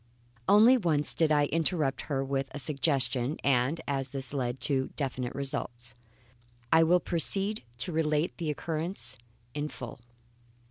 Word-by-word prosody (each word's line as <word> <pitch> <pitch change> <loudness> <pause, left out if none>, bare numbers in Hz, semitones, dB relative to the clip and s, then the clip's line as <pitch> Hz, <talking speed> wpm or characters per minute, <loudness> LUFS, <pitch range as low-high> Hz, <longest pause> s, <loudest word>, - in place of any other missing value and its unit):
Only 225 +6 +7
once 160 -9 +1
did 160 -2 +2
I 145 -1 +4
interrupt 155 -3 0
her 135 -2 0
with 135 0 -1
a - - -7
suggestion; 135 -2 +1
and 140 +3 +2
as 135 -2 -1
this 135 -1 -3
led 125 -2 -2
to 135 -1 +1
definite 130 -3 -3
results, 120 -4 -4 0.8
I 160 - +6
will 175 +2 +5
proceed 195 +6 -1 0.2
to 130 +9 -2
relate 155 0 0
the 165 -3 -3
occurrence 155 -3 -1 0.4
in 150 0 -2
full. 125 -4 -8
145 Hz, 140 wpm, -29 LUFS, 130-160 Hz, 0.8 s, Only